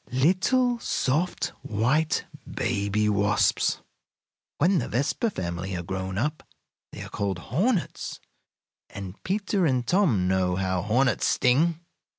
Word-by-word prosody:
Little, 190 - +2
soft, 160 - 0
white 145 - +1 0.3
baby 105 -1 0
wasps. 100 -1 +2 0.8
When 180 +4 +3
the - - -3
Vespa 140 - 0
family 90 - -4
are 90 - -4
grown 95 +1 -4
up 150 +8 -1 0.5
they - - -7
are - - -8
called 100 -2 -2
hornets, 180 - -1 0.7
and 100 0 -8
Peter 195 -2 0
and 130 -3 +1
Tom 145 - +2
know 95 -1 +1
how 95 -1 0
hornets 120 +4 +2
sting! 155 +7 +2
125 Hz, 120 wpm, -26 LUFS, -, 0.8 s, When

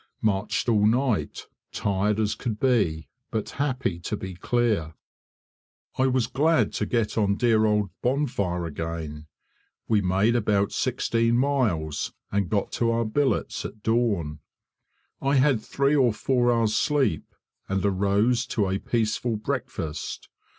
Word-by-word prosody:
Marched 105 +1 0
all 105 -3 +4
night, 125 0 0 0.3
tired 100 +1 0
as 105 -1 +1
could 110 -5 -4
be, 85 - +1 0.2
but 110 -2 -3
happy 130 -11 -1
to 105 +4 -3
be 95 -1 -6
clear. 100 -5 0 1.0
I 130 - +2
was 130 -2 +2
glad 150 +7 +2
to - - -2
get 110 -2 0
on 100 -2 +2
dear 110 -1 +3
old 105 -3 +1
Bonfire 120 -10 0
again. 80 -1 -5 0.6
We 110 -2 +3
made 95 +5 +2
about 105 -3 +1
sixteen 115 0 +1
miles, 115 - 0 0.2
and 100 -3 0
got 100 -2 0
to 115 - 0
our 115 0 +1
billets 135 +6 0
at 110 - -8
dawn. 105 -10 0 0.8
I 140 +1 +2
had 135 -4 +3
three 140 +5 +1
or 125 -6 +4
four 120 +1 +1
hours' 115 -2 +1
sleep, 140 - 0 0.3
and 95 0 0
arose 100 +6 +2
to 105 -5 0
a 95 +1 -1
peaceful 115 0 -1
breakfast. 105 - -4
110 Hz, 135 wpm, -25 LUFS, 95-120 Hz, 1.0 s, all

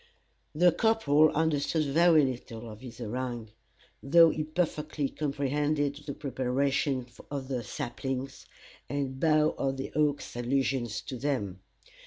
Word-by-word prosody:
The 175 +3 +5
corporal 155 -8 +4
understood 155 0 +1
very 160 +1 +5
little 120 -3 -5
of 105 - -11
this 120 -3 -10
harangue, 120 -1 -4 0.5
though 165 +3 +6
he 155 - -2
perfectly 155 -3 -2
comprehended 145 0 -1
the 140 - -4
preparations 135 -1 -1
of 140 -2 -5
the 130 -3 -1
saplings, 135 +1 -5 0.4
and 135 -1 -3
Bough 155 0 +3
of 135 0 0
the 135 - -5
Oak's 145 -3 0
allusions 120 -2 0
to 130 - -6
them. 115 -9 -2
140 Hz, 125 wpm, -29 LUFS, 130-150 Hz, 0.5 s, though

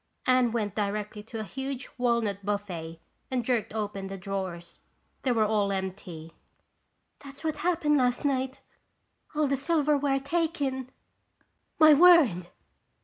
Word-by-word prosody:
Anne 255 -2 +3
went 215 -4 -2
directly 210 0 -3
to 225 +1 -8
a - - -3
huge 265 +4 -5
walnut 235 -5 0
buffet 180 -5 -4 0.3
and 250 -3 -1
jerked 240 -4 0
open 205 -3 -4
the 195 0 -6
drawers. 180 -3 -5 0.4
They 260 - 0
were 225 -3 +3
all 210 -2 +1
empty. 185 -4 -5 0.9
"That's 280 +1 -12
what 310 -2 -1
happened 315 -2 +1
last 250 +2 +1
night. 265 -1 -1 0.7
All 305 0 +2
the 275 0 +1
silverware 290 -1 +1
taken!" 280 -4 -2 0.9
"My 310 -1 +8
word!" 290 - +6
240 Hz, 130 wpm, -28 LUFS, 200-280 Hz, 0.9 s, My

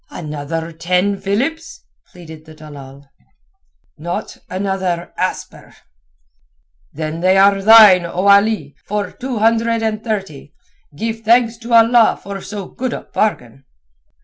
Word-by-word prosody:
"Another 155 +1 -6
ten 180 +4 -1
philips?" 255 +12 -3 0.3
pleaded 160 -3 -13
the 155 -1 -14
dalal. 140 -2 -13 0.9
"Not 175 +3 -5
another 185 -2 -3
asper." - - -5 1.2
"They 165 +5 -1
are 195 0 +4
thine, 210 -3 +8
then, 170 0 -7
O 185 +2 -2
Ali, 200 -7 +3
for 205 -2 -4
two 255 -1 -6
hundred 230 +1 +1
and 220 0 -2
thirty. 195 - -5 0.4
Give 225 +6 -4
thanks 230 +1 +2
to 235 +1 -6
Allah 230 0 +4
for 200 0 -8
so 205 -1 -7
good 255 +4 -5
a - - -5
bargain." 135 - -3
195 Hz, 120 wpm, -17 LUFS, 165-225 Hz, 1.2 s, thine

